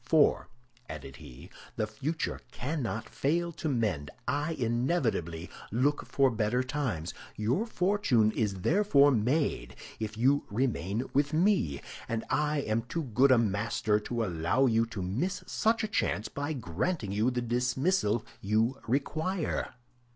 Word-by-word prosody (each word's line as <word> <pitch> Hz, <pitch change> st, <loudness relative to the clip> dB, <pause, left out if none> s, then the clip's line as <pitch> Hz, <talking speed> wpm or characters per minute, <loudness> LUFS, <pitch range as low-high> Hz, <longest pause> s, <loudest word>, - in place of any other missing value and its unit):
"For," 150 Hz, +4 st, +3 dB, 0.4 s
added 70 Hz, -4 st, -8 dB
he, 70 Hz, +10 st, -12 dB, 0.2 s
"the 110 Hz, -, 0 dB
future 135 Hz, +10 st, -3 dB
cannot 125 Hz, -5 st, -3 dB
fail 170 Hz, +5 st, 0 dB
to 155 Hz, -1 st, -3 dB
mend; 105 Hz, -, 0 dB, 0.2 s
I 145 Hz, +5 st, 0 dB
inevitably 115 Hz, -, 0 dB, 0.2 s
look 135 Hz, +7 st, +1 dB
for 135 Hz, -2 st, +3 dB
better 115 Hz, +3 st, +1 dB
times. 125 Hz, -, -2 dB, 0.2 s
Your 125 Hz, -, 0 dB
fortune 180 Hz, -, +2 dB
is 100 Hz, -4 st, -1 dB
therefore 150 Hz, -, +5 dB
made 120 Hz, -, 0 dB, 0.2 s
if 110 Hz, 0 st, -4 dB
you 135 Hz, +5 st, +3 dB
remain 110 Hz, -2 st, -1 dB
with 145 Hz, +1 st, +2 dB
me, 160 Hz, -, +2 dB, 0.3 s
and 115 Hz, -1 st, -2 dB
I 150 Hz, 0 st, +1 dB
am 110 Hz, -2 st, 0 dB
too 140 Hz, +8 st, -4 dB
good 130 Hz, +2 st, +3 dB
a 130 Hz, -, +7 dB
master 105 Hz, -1 st, +1 dB
to 115 Hz, +2 st, -2 dB
allow 85 Hz, +8 st, +1 dB
you 115 Hz, -2 st, +3 dB
to 105 Hz, -5 st, -5 dB
miss 125 Hz, -, -2 dB
such 225 Hz, 0 st, +1 dB
a -, -, 0 dB
chance 110 Hz, -, -1 dB
by 145 Hz, +2 st, -3 dB
granting 115 Hz, -, -2 dB
you 105 Hz, +5 st, +2 dB
the 125 Hz, -1 st, -2 dB
dismissal 125 Hz, -, +1 dB, 0.2 s
you 110 Hz, +6 st, +1 dB
require." 155 Hz, +8 st, -1 dB
120 Hz, 140 wpm, -30 LUFS, 105-145 Hz, 0.4 s, a